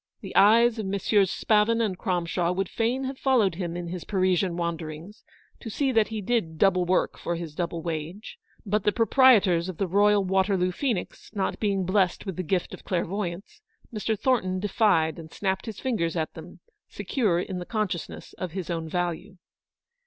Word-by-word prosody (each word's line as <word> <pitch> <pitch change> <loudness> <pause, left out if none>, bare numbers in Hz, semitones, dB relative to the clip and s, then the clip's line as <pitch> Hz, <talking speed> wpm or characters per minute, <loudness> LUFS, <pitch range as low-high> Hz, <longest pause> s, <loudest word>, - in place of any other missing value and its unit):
The - - -9
eyes 225 +3 +5
of 210 - -3
Messrs. 200 0 +2
Spavin 215 +3 +2
and 215 -5 0
Cromshaw 175 -2 -1
would 195 0 -1
fain 240 +4 -1
have 265 0 -5
followed 240 -9 +3
him 170 -1 -4
in 175 -1 -5
his 180 -1 -5
Parisian 185 -2 +1
wanderings, 170 +2 -5 0.4
to 230 - -7
see 270 +5 0
that 225 -3 +3
he 220 -1 -4
did 185 -7 -1
double 185 0 +3
work 180 +1 0
for 170 - -2
his 165 -3 -6
double 170 0 -3
wage; 165 +5 -5 0.3
but 210 0 0
the 210 - +3
proprietors 210 -6 +4
of 180 - -6
the 195 - 0
Royal 205 +2 +3
Waterloo 190 -1 +1
Phoenix 225 -1 -3
not 195 -2 -1
beicg 200 -3 0
blest 185 0 +1
with 190 -3 -4
the 185 - -2
gift 180 +1 -1
of - - -10
clairvoyance, 190 - -3 0.3
Mr. 220 0 -1
Thornton 190 -7 +1
defied 185 -5 +2
and 160 -1 -10
snapped 190 +1 -2
his 220 - -6
fingers 180 -11 -1
at 160 -1 -2
them, 165 +2 -12 0.3
secure 210 -10 0
in 185 0 -4
the 175 - -6
consciousness 210 -7 -4
of 180 -3 -4
his 185 -2 -4
own 165 -1 -3
value. 175 +3 -3
190 Hz, 180 wpm, -26 LUFS, 175-215 Hz, 0.4 s, eyes